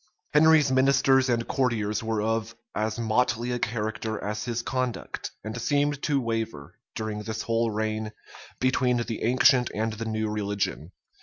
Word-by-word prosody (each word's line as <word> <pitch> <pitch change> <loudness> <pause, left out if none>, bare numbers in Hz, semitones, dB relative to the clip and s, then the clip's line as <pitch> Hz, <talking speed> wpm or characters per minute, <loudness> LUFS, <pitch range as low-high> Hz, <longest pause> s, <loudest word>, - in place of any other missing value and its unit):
Henry's 155 -2 +6
ministers 135 0 +4
and 120 -1 0
courtiers 115 -6 0
were 110 -1 -1
of 115 +1 -1 0.2
as 110 +1 -1
motley 120 +1 +1
a 120 - -1
character 110 -1 -2
as 105 +2 -3
his 120 -1 -2
conduct; 130 -2 -3
and 110 +3 -5
seemed 145 +1 +1
to 145 -2 +1
waver, 115 - -4 0.2
during 110 -1 -3
this 110 +1 -4
whole 115 0 +1
reign, 110 0 -2 0.5
between 130 -1 +2
the 115 -1 -3
ancient 125 +1 +4
and 110 +1 -1
the 115 +1 -5
new 110 -1 -1
religion. 100 -5 -2
115 Hz, 150 wpm, -26 LUFS, 110-125 Hz, 0.5 s, Henry's